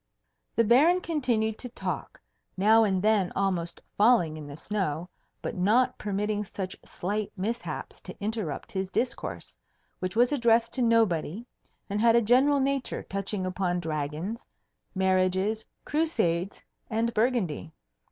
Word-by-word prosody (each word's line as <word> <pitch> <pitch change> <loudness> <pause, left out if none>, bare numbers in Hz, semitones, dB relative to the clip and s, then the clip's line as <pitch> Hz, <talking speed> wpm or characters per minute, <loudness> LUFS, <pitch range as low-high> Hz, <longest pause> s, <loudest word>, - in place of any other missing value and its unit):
The 230 - +4
Baron 285 - +5
continued 240 -10 0
to 250 - -6
talk, - - -5 0.4
now 220 +4 +5
and 190 -3 +1
then 210 -4 +3
almost 185 -4 -1 0.2
falling 205 -8 +4
in 155 -2 -8
the 145 0 -8
snow, 180 -4 -2 0.4
but - - -3
not 215 +8 +3
permitting 210 +1 -1
such 190 -1 -5
slight 205 +3 -3
mishaps 225 +6 -4
to - - -10
interrupt 210 -7 -3
his 190 -1 -2
discourse, 240 +5 -3 0.4
which 185 +1 -3
was 245 +3 +4
addressed 235 -4 +3
to 260 - -1
nobody 225 -4 +2 0.4
and 205 +1 -1
had 230 0 +5
a 235 - +5
general 265 +6 +4
nature, 275 -1 -1
touching 195 0 -3
upon 180 -1 -1
dragons, 160 - -4 0.5
marriages, 190 +3 +1 0.2
Crusades, 200 - 0 0.3
and 230 +1 0
Burgundy. 215 - 0
210 Hz, 130 wpm, -28 LUFS, 185-235 Hz, 0.5 s, Baron